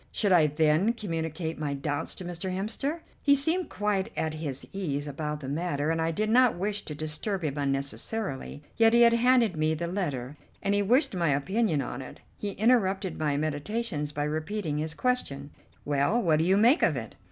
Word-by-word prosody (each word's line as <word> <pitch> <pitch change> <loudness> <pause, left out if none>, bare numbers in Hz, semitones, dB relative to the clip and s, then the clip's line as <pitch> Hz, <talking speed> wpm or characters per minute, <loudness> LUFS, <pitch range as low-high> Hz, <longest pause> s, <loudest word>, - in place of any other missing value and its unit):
Should 205 -3 +1
I 165 -4 +6
then 155 +8 +2
communicate 165 -6 -4
my 145 -2 -2
doubts 145 +1 -3
to 185 - -7
Mr. 175 +2 -4
Hemster? 225 - -2 0.2
He 285 -1 +5
seemed 325 +6 +2
quite 205 0 -1
at 160 -1 -1
his 150 -4 -4
ease 150 -7 -2
about 150 +1 -4
the 135 - -6
matter, 150 0 -1
and 165 0 0
I 165 - +1
did 210 +7 -1
not 245 -4 +4
wish 205 +3 -1
to 150 - -5
disturb 155 +6 -4
him 145 -3 -2
unnecessarily. 140 +3 -1
Yet 225 0 +5
he 235 0 +6
had 235 0 +6
handed 235 -4 +3
me 155 0 +1
the 170 +2 -3
letter, 150 -7 -3 0.3
and 200 - +1
he 205 - +2
wished 250 +7 +2
my 170 -4 +1
opinion 155 +3 +1
on 125 +1 -5
it. 130 - -10 0.2
He 205 -1 -3
interrupted 195 -4 +1
my 150 -2 0
meditations 155 +2 -2
by 145 0 -2
repeating 155 +1 -2
his 155 +1 -3
question: 145 - -1 0.3
"Well, 145 +10 +1
what 160 -8 +2
do 160 - +2
you 190 +2 +4
make 240 +9 +5
of - - +2
it?" - - -6
170 Hz, 195 wpm, -28 LUFS, 150-210 Hz, 0.3 s, I